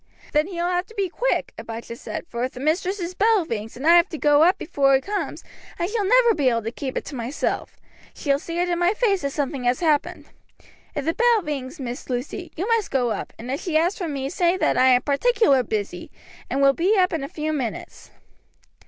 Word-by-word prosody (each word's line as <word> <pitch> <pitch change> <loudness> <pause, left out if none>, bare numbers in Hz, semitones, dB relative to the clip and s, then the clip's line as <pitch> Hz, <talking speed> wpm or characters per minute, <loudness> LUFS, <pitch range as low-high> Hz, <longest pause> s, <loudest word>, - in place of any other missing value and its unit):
"Then 300 +2 +3
he 375 - -8
will 340 +1 -1
have 360 +1 -1
to 450 - -16
be 390 -2 -1
quick," - - -1
Abijah 230 +1 -7
said, 235 - -6
"for 235 0 -4
if 255 - -2
the 250 - -9
mistress' 355 +5 -1
bell 415 -1 +3
rings, 225 -5 -5
and 265 - -6
I 335 +1 +7
have 345 +2 +4
to 320 - -5
go 295 0 +4
up 355 +4 +5
before 275 -2 +2
he - - +3
comes, 410 +6 -4 0.3
I 345 - -1
shall 420 +2 -1
never 475 +2 +5
be 285 -8 +2
able 230 -2 0
to 225 - -3
keep 260 +1 -5
it - - -3
to 290 - -7
myself. 245 +4 -3 0.4
She 285 - -1
will 275 - +2
see 335 +3 -6
it 355 +1 +1
in 345 -1 -1
my 355 +4 +2
face 410 -5 +1
that 280 - -1
something 275 -2 -3
has 245 +1 +2
happened. 310 -4 0 0.7
If 285 - -3
the 325 - +1
bell 470 -2 +3
rings, 285 0 -5
Miss 245 -1 -6
Lucy, 255 +8 -4
you 365 +6 -3
must 460 -3 +1
go 245 -3 +1
up, - - -4
and 240 +3 -6
if 275 - -3
she 330 -4 0
asks 345 +6 +1
for 355 - -2
me, 275 -3 -3
say 355 0 +2
that - - +1
I 255 +1 +4
am 250 -1 +5
particular 285 - +3
busy, 205 -6 -4 0.4
and 275 +3 0
will 275 0 +6
be 375 +8 +2
up 365 -2 +3
in 320 -4 -2
a - - -3
few 310 0 -3
minutes." 255 -7 -5
310 Hz, 240 wpm, -23 LUFS, 260-365 Hz, 0.7 s, I